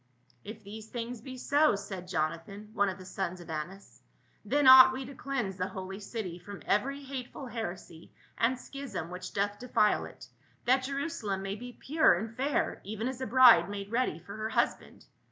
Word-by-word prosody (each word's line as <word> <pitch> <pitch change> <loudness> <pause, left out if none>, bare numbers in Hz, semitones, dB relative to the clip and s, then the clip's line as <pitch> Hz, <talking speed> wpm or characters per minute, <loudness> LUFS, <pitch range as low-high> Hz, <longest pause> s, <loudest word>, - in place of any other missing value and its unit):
" - - -32
If 215 +1 -9
these 215 +2 -9
things 240 -1 -5
be 260 +1 -8
so," 290 +1 +3
said 190 -2 -7
Jonathan, 180 +5 -3
one 200 -3 +2
of 190 - -5
the 185 - -11
sons 185 -1 -4
of 175 -1 -9
Annas, 160 -2 -7 0.2
" - - -37
then 280 +7 +1
ought 260 0 +10
we 260 0 -5
to 280 - -9
cleanse 245 -8 -3
the 185 -1 -1
holy 190 0 -7
city 200 -4 -5
from 205 +2 -10
every 275 +7 0
hateful 270 +1 -7
heresy 185 -8 -7 0.2
and 240 +3 +1
schism 245 - -6
which 180 0 -6
doth 205 0 -1
defile 240 -4 +2
it, - - -12 0.4
that 260 +2 +4
Jerusalem 275 -9 -3
may 195 0 -3
be 245 +4 -8
pure 310 - +4
and 220 +5 -5
fair 275 +4 -1
even 220 +4 -4
as 260 0 -5
a 260 - -2
bride 220 -7 +7
made 200 0 -6
ready 235 -9 0
for 180 +5 -10
her 215 0 -3
husband. - - -1
215 Hz, 190 wpm, -30 LUFS, 190-255 Hz, 0.4 s, ought